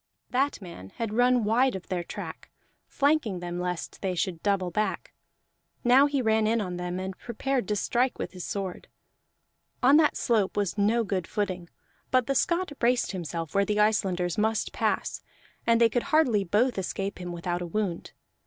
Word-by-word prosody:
That 275 +3 +1
man 95 - -10
had 225 -2 -3
run 245 +1 +4
wide 240 +4 +3
of 190 - -6
their 180 -2 -2
track, - - -8 0.4
flanking 280 - +1
them 175 0 -4
lest 180 -1 -4
they 190 -2 -1
should 170 -1 -2
double 195 -3 0
back; 215 +4 -2 0.7
now 260 +4 +6
he 280 -3 0
ran 220 -1 +3
in 230 +1 +2
on 180 -4 -3
them 180 +1 -3
and 190 0 -4
prepared 245 -1 -2
to 210 - 0
strike 245 +5 +1
with - - -4
his 180 -2 -8
sword. 195 -3 -4 1.0
On 275 +4 +7
that 310 -1 +3
slope 215 -6 +1
was 205 -3 0
no 215 +3 +2
good 190 -4 -2
footing; 185 -5 -3 0.4
but 255 -2 +3
the 275 - 0
Scot 340 +5 +1
braced 245 +1 +2
himself 170 -4 -5
where 200 - +3
the 210 +1 0
Icelanders 190 -4 +1
must 220 0 0
pass, - - -1 0.5
and 230 0 +5
they 230 - +6
could 235 +1 -1
hardly 260 -10 +3
both 210 +5 +1
escape 195 +1 -3
him 175 0 -5
without 175 +1 -3
a 175 - -3
wound. 180 -1 -3
210 Hz, 180 wpm, -27 LUFS, 180-245 Hz, 1.0 s, On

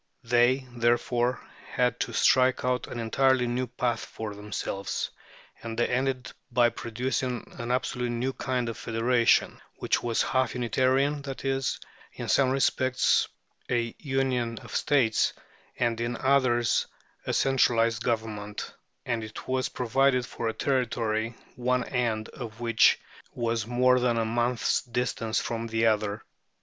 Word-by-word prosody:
They, 120 +3 +3
therefore, 120 +1 +1 0.3
had 125 -1 +1
to - - -2
strike 130 -1 +3
out 125 0 0
an 120 - -6
entirely 130 +3 +2
new 125 +1 -1
path 120 -1 -1
for 110 -2 -6
themselves, 100 -1 -4 0.5
and 115 -1 -6
they 120 - +3
ended 130 0 -1 0.2
by 120 0 +4
producing 125 +1 -3
an 120 0 -4
absolutely 125 -1 -1
new 130 +3 -1
kind 125 -2 -2
of 115 -4 -5
federation, 115 +2 +2
which - - 0
was 115 -1 +1
half 130 -4 0
Unitarian, 130 +4 +1
that 135 -1 -7
is, 135 -1 0 0.3
in - - -6
some 135 -2 +4
respects 130 -1 +2 0.4
a 115 -1 0
union 130 -5 -1
of - - -8
states, 130 -7 +2 0.4
and 115 -1 0
in 120 0 -2
others 130 -3 +2 0.4
a - - +1
centralized 115 -3 +2
government; 110 -3 -3 0.3
and 115 -2 -1
it 110 0 -9
was 130 0 0
provided 125 +1 +2
for 115 - -4
a 110 - -1
Territory 115 -4 -1 0.2
one 125 +1 +1
end 115 -4 -1
of 115 -3 -8
which 115 -1 +4 0.4
was 115 -2 -1
more 125 +1 +4
than 120 -1 +1
a 115 - +1
month's 120 +1 +1
distance 120 -2 -1
from 115 0 -3
the 115 0 +1
other. 105 -1 +1
120 Hz, 140 wpm, -27 LUFS, 115-130 Hz, 0.5 s, by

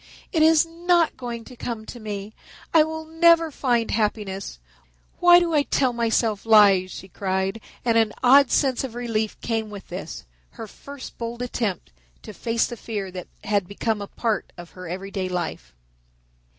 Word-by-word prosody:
"It 325 - +1
is 320 +1 +6
not 340 0 +1
going 235 -2 -6
to 255 - -12
come 230 -2 -5
to 240 - -9
me. 210 -1 -6 0.4
I 325 - +7
will 315 +1 -2
never 330 0 +4
find 240 -5 0
happiness. 210 -3 -2 0.6
Why 350 0 +8
do 345 -2 -1
I 300 - +4
tell 260 -3 +1
myself 225 -2 0
lies?" 205 -4 +6
she 190 - -9
cried, 190 +2 -2 0.2
and 230 -1 +4
an 220 -2 +2
odd 270 +1 +7
sense 265 -3 +1
of 250 -3 -6
relief 225 -3 -2
came 225 -2 -2
with 205 -2 -10
this, 175 - -7 0.3
her - - -6
first 280 +5 -11
bold 235 +1 -4
attempt 225 -6 -3 0.3
to - - -9
face 230 0 0
the 240 - -7
fear 205 -4 -5
that 180 -1 -7 0.2
had 200 -3 0
become 210 +2 -2
a 200 - -5
part 225 0 -2
of 175 -1 -11
her 180 -2 -9
everyday 190 +1 -4
life. 160 - -4
225 Hz, 170 wpm, -24 LUFS, 200-265 Hz, 0.6 s, Why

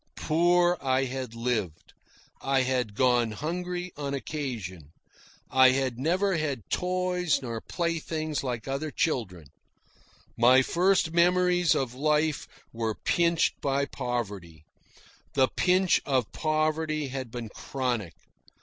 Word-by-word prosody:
Poor 175 +2 +3
I 130 0 +1
had 130 -2 -5
lived. 115 -9 -3 0.5
I 135 -1 +2
had 125 -5 -1
gone 120 -2 +2
hungry 180 +6 -4
on 140 -1 -3
occasion. 110 - -5 0.6
I 130 0 +7
had 130 -2 -1
never 180 +6 +1
had 140 - -3
toys 180 -3 0
nor 115 -2 -4
playthings 160 -3 -2
like 125 -3 -4
other 140 +3 -2
children. 95 - -2 0.9
My 125 +3 +6
first 180 +1 +2
memories 180 -1 +3
of 130 -3 -1
life 150 +2 0 0.3
were 115 -1 -2
pinched 170 -1 +1
by 140 0 +1
poverty. 100 - -5 0.7
The 130 -2 +4
pinch 185 0 +2
of 130 -5 0
poverty 155 -1 -1
had 130 -2 -5
been 115 -1 -6
chronic. 120 -9 -3
135 Hz, 115 wpm, -27 LUFS, 120-165 Hz, 0.9 s, I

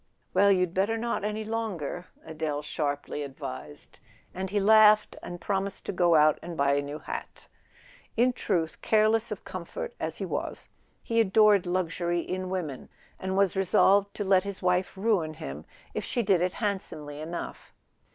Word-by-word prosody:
"Well—you'd 185 -2 +4
better 200 +4 +1
not, 235 -2 -2
any 210 +1 -2
longer," 200 -7 -3 0.2
Adele 155 -2 -3
sharply 145 -1 -3
advised; 135 - -8 0.3
and 190 +1 -4
he 205 +2 +1
laughed, 215 +1 +6
and 175 - -7
promised 195 +2 -2
to - - -2
go 175 -2 +3
out 155 -1 +5
and 170 -1 -7
buy 140 0 +3
a 140 - +2
new 145 +1 -6
hat. - - -7 0.7
In 250 +2 +4
truth, 170 -9 -1
careless 220 +1 +3
of - - -6
comfort - - -6
as - - -3
he - - -3
was, - - -4 0.4
he 230 0 0
adored 210 -2 +4
luxury 175 -1 0
in 185 +1 -4
women, 165 -8 -4 0.3
and 190 0 -2
was 195 -2 +3
resolved 195 +1 +4
to 210 - -2
let 190 -1 +4
his 200 -1 -5
wife 180 +1 +1
ruin 190 -7 +1
him 70 - -7 0.3
if - - -3
she 240 - -1
did 190 -4 +3
it 180 +1 +1
handsomely 155 -8 -3
enough. 170 +2 -6
185 Hz, 160 wpm, -28 LUFS, 160-205 Hz, 0.7 s, laughed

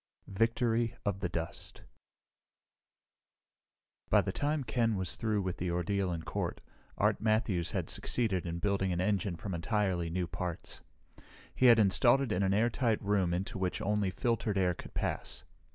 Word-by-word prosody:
Victory 115 +2 +1
of 100 -2 -1
the 90 -2 -2
Dust 85 -1 -5 2.3
By - - +5
the - - -2
time 145 +6 -1
Ken 115 -2 +1
was 95 -3 0
through 110 -3 0
with 95 -1 -3
the 90 - -2
ordeal 90 +2 0
in 85 -1 -4
court, - - -3 0.4
Art - - +2
Matthews 110 -6 +1
had - - -2
succeeded 100 -8 -1
in 85 0 -3
building 95 +1 0
an 85 - -1
engine 95 -1 0
from 95 +4 -5
entirely 90 -1 0
new 90 +2 -1
parts. 85 0 -5 0.7
He 130 - +4
had 120 -1 +8
it 110 - +6
installed 120 +5 +3
in 90 - +1
an 95 -1 +2
airtight 115 +2 +2
room 100 -3 +1
into 95 +4 -3
which 90 -1 -1
only 105 -1 0
filtered 110 0 -1
air 90 -2 +2
could - - -11
pass. - - -3
100 Hz, 160 wpm, -32 LUFS, 90-115 Hz, 2.3 s, had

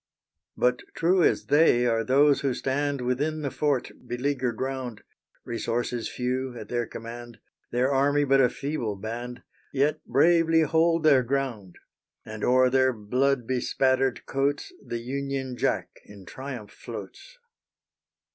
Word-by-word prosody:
But - - +2 0.2
true 180 +2 +3
as - - +2
they 145 -5 +4
are 115 -2 +1
those 140 +4 +4
who 135 -3 0
stand 140 0 -1
Within 145 +5 -1
the 140 - -2
fort 135 -1 0 0.2
beleaguered 125 -1 -2
round; 130 -4 -4 0.4
Resources 120 0 -2
few 125 0 -3
at 110 -2 -9
their 120 -2 -1
command, 120 +1 -9 0.3
Their 125 +3 +1
army 145 +2 +3
but 135 -1 +4
a 125 - +4
feeble 135 -5 -3
band, 120 +4 -6 0.3
Yet 145 +3 0
bravely 165 +3 +4
hold 165 +2 +2
their 140 -4 +6
ground; 125 -7 -3 0.5
And 110 -1 -7
o'er 130 0 +4
their 130 0 +4
blood 125 +4 0
bespattered 130 +1 0
coats 140 - -1
The 120 - -4
Union 135 0 -3
Jack - - 0
in 100 -2 -14
triumph 125 +3 -8
floats. - - -10
130 Hz, 135 wpm, -26 LUFS, 120-140 Hz, 0.5 s, their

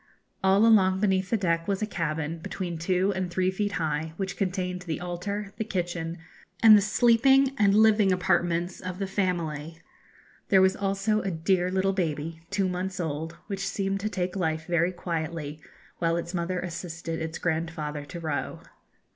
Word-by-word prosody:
All 195 +3 +5
along 190 -4 +5
beneath 190 -2 +1
the 230 - +2
deck 170 -4 0
was 200 +1 0
a - - +2
cabin, 165 -4 -3
between 175 0 -5
two 185 +3 +1
and 185 -1 -2
three 185 +1 +1
feet 205 +1 -2
high, 160 0 -2
which 190 -1 -3
contained 180 -1 -2
the 165 -3 -4
altar, 195 +3 -4
the 220 - -1
kitchen, 175 -4 -3 0.5
and 220 -1 +10
the 205 - +6
sleeping 245 +6 +4
and 200 -1 +4
living 215 -2 +5
apartments 175 0 +1
of 185 -1 -5
the 195 - -2
family. 165 -5 -2 0.7
There 195 - +6
was 190 0 +4
also 200 +2 0
a 195 - -2
dear 180 +2 +1
little 190 +1 +1
baby, 165 -3 -2
two 200 -1 +1
months 185 +1 -3
old, 160 0 -3
which 195 -1 -3
seemed 195 0 -1
to 215 +2 -2
take 185 -3 -2
life 160 -4 -1
very 170 +1 +1
quietly, 160 -4 -4 0.4
while 165 0 +1
its 170 +1 -4
mother 180 +1 -1
assisted 165 -2 -5
its 160 +1 -4
grandfather 160 -3 -2
to 170 +4 -8
row. 155 -3 -3
180 Hz, 170 wpm, -27 LUFS, 165-195 Hz, 0.7 s, and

